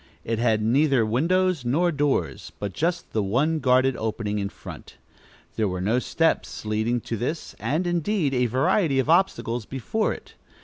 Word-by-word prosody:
It 115 -1 -2
had 110 -2 +2
neither 130 +1 +3
windows 170 +7 +1
nor 160 +9 +2
doors, 145 -2 -1
but 100 -2 -4
just 175 +2 -2
the 110 - +1
one 135 +11 +1
guarded 130 -1 +3
opening 110 -2 -2
in 100 0 -2
front. - - -11 0.6
There 110 - +2
were 90 -1 -3
no 110 +7 +1
steps 165 -3 -1
leading 110 +3 0
to 115 - -4
this, 130 +9 -4
and, 160 +6 -1
indeed, 175 -3 0
a 125 -1 +2
variety 135 - +2
of 135 +4 +2
obstacles 125 - +1
before 135 - -1
it. - - -9
130 Hz, 165 wpm, -24 LUFS, 110-160 Hz, 0.6 s, neither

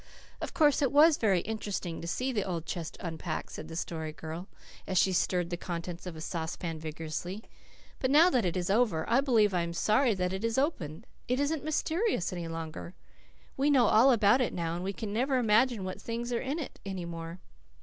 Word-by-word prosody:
"Of - - -5
course 295 -3 +4
it 270 -3 +2
was 300 +2 +6
very 195 -6 +2
interesting 205 -6 -4
to 170 - -6
see 255 +9 -1
the 210 -5 0
old 170 -4 -3
chest 165 -1 -5
unpacked," 165 -1 -4
said 155 - -7
the 165 - -8
Story 160 -2 -3
Girl 160 +4 -7 0.4
as 185 - -1
she 190 +1 +4
stirred 180 0 +1
the 175 - -1
contents 175 0 -5
of 175 - -6
a 160 - -8
saucepan 165 0 -4
vigorously. 160 +6 -5 0.6
"But 260 - 0
now 320 +6 +6
that 250 -3 +2
it 180 0 -1
is 180 +1 -1
over 205 -8 +2
I 240 +4 +4
believe 225 -7 +3
I 175 - +2
am 170 0 -3
sorry 220 +6 +3
that 180 0 -1
it 190 +3 -4
is 230 +1 0
opened. 215 - -1 0.2
It 250 +2 +1
isn't 285 +1 0
mysterious 315 - 0
any 175 -2 -4
longer. 165 +1 -6 0.6
We 275 +2 +2
know 265 -4 +5
all 230 +5 +6
about 230 +2 +4
it 250 - -1
now, 165 -2 -2
and 175 +1 -4
we 195 - -1
can 205 0 -5
never 260 +4 +1
imagine 230 -1 +3
what 185 0 -5
things 235 +1 -3
are 235 - 0
in 275 +4 -2
it 310 - -6
any 190 -3 -4
more." 165 +1 -7
195 Hz, 210 wpm, -30 LUFS, 170-250 Hz, 0.6 s, was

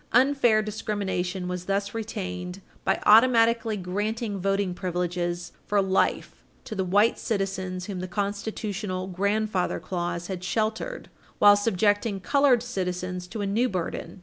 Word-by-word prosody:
Unfair 245 -3 +4
discrimination 195 -4 -2
was 180 0 -4
thus 200 +1 -1
retained 185 -5 -5 0.2
by - - +1
automatically 230 0 +5
granting 205 +3 -2
voting 195 0 0
privileges 175 -1 -2 0.2
for 205 - +2
life 190 0 0 0.2
to - - -7
the 190 -3 -1
white 205 +5 +3
citizens 190 -3 -2
whom 195 -2 -5
the 185 - -4
constitutional 200 0 -3
"grandfather 200 +1 0
clause" 175 -1 -3
had 185 -1 -5
sheltered 220 - -2 0.3
while 205 0 +8
subjecting 205 0 +1
colored 265 +3 +3
citizens 180 -5 -3
to 215 +3 -5
a - - -1
new 225 +6 +1
burden. 175 -1 -4
200 Hz, 130 wpm, -26 LUFS, 180-215 Hz, 0.3 s, while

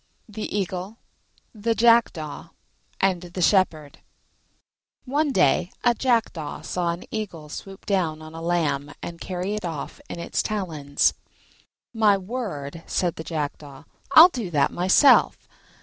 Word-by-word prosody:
THE 210 -1 -5
EAGLE, 190 +3 -4 0.6
THE 225 +1 -1
JACKDAW, 225 -9 +2 0.5
AND 190 -3 +2
THE 180 +1 -7
SHEPHERD 165 -7 +1 1.1
One 290 +3 0
day 175 - +2
a 240 - +4
Jackdaw 230 - -1
saw 175 -2 -2
an 170 +1 -3
Eagle 175 -9 -5
swoop 195 +5 -9
down 175 -6 0
on 155 0 -11
a 165 - -8
lamb 145 -4 -1
and 170 -1 -7
carry 185 +2 -3
it 210 - -4
off 165 -5 -6
in - - -6
its 170 - -2
talons. 160 -9 0 0.8
"My 215 -3 +4
word," 185 - -5
said 175 -2 -1
the 160 - -7
Jackdaw, 145 -3 -5 0.3
"I'll 330 +3 +10
do 240 - -5
that 145 -4 +2
myself." 190 +10 +4
180 Hz, 135 wpm, -24 LUFS, 155-215 Hz, 1.1 s, I'll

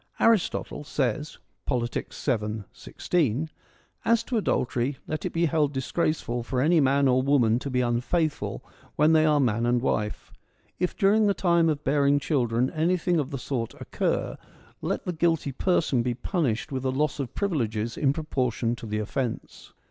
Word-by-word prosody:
Aristotle 225 -8 +1
says 145 0 -2 0.3
(Politics, 120 -1 -2
7, 110 -5 -2
16): 155 -2 -1 0.5
As 230 -1 +3
to 250 - -4
adultery, 130 - 0
let 155 - -4
it - - -3
be 170 +1 +1
held 150 -2 +1
disgraceful 135 -2 -1
for 125 +2 -2
any 160 +5 +4
man 140 0 +3
or 130 0 +3
woman 125 -4 +3
to 140 - -5
be 125 -1 +1
unfaithful 125 +7 -1 0.3
when 155 +2 +4
they 155 0 +5
are 150 -1 +4
man 120 -3 +1
and 120 0 +3
wife. 105 -4 -2 0.5
If 180 - -1
during 210 +1 +4
the 200 - +2
time 170 -2 +3
of 150 -1 -2
bearing 140 0 +3
children 125 -3 0
anything 175 +1 +1
of 140 -3 -2
the 140 - -4
sort 120 -3 -3
occur, - - -2 0.4
let - - -2
the 180 - -2
guilty 165 -3 +1
person 155 -3 +1
be 120 0 -1
punished 135 - -1
with 130 -1 -3
a 130 - +1
loss 145 +2 0
of 135 -4 -4
privileges 115 - -1
in 140 -3 +2
proportion 130 -6 -1
to 115 - -8
the 105 0 -2
offence. 110 +3 -4
140 Hz, 165 wpm, -26 LUFS, 120-160 Hz, 0.5 s, they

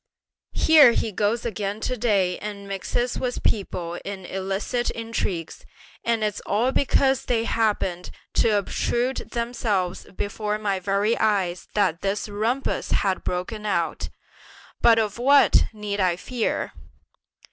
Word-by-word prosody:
Here 300 -7 +7
he 225 - -1
goes 210 +4 0
again 210 -2 -3
to 255 - -1
day 200 -6 +1
and 200 -1 -7
mixes 200 +5 -2
with 250 -1 -3
people 175 -4 -1
in 195 -2 -6
illicit 195 +6 -2
intrigues; 215 -7 -4 0.4
and 230 -2 +1
it's 210 -1 -1
all 230 +6 +2
because 270 -1 +2
they 230 -2 +1
happened 205 -6 0 0.2
to 215 -2 +3
obtrude 240 +5 -1 0.2
themselves 225 -6 -1
before 210 +1 -2
my 200 -3 -1
very 200 +4 +1
eyes 195 -5 0
that 185 -5 +1
this 200 +2 -1
rumpus 225 +6 -1
has 190 -2 +1
broken 195 +5 -3
out; 170 -6 -1 0.7
but 230 -1 +6
of 215 0 0
what 280 +3 +5
need 210 -2 -4
I 180 -3 +2
fear?" 235 +5 -2
210 Hz, 130 wpm, -24 LUFS, 195-235 Hz, 0.7 s, Here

